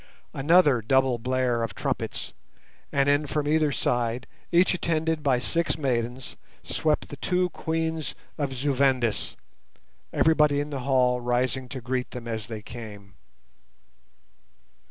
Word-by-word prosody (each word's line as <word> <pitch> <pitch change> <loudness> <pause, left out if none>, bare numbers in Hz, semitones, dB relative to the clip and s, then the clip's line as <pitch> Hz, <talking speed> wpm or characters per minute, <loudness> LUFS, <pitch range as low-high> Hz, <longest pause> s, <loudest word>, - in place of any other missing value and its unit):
Another 145 -3 +4
double 130 +1 +2
blare 125 0 0
of 115 -4 -3
trumpets, - - -3 0.6
and 140 0 +2
in 145 +1 +3
from 150 0 -1
either 155 -1 +3
side, 120 -1 0 0.3
each 175 +2 +4
attended 160 -2 0
by 135 -4 +2
six 165 +8 0
maidens, 125 -3 -2 0.3
swept 155 -1 0
the 145 - -8
two 180 +3 0
Queens 160 -1 -2 0.2
of 145 -3 -2
Zu 135 +2 -1
Vendis, 130 -4 +1 0.8
everybody 150 -3 +3
in 145 +1 -3
the 140 - -3
hall 125 -2 +3
rising 125 +1 0
to 130 - -6
greet 125 +1 -2
them 120 -1 -8
as 110 -2 -4
they 110 -2 -7
came. 105 -5 -10
130 Hz, 135 wpm, -26 LUFS, 120-150 Hz, 0.8 s, Another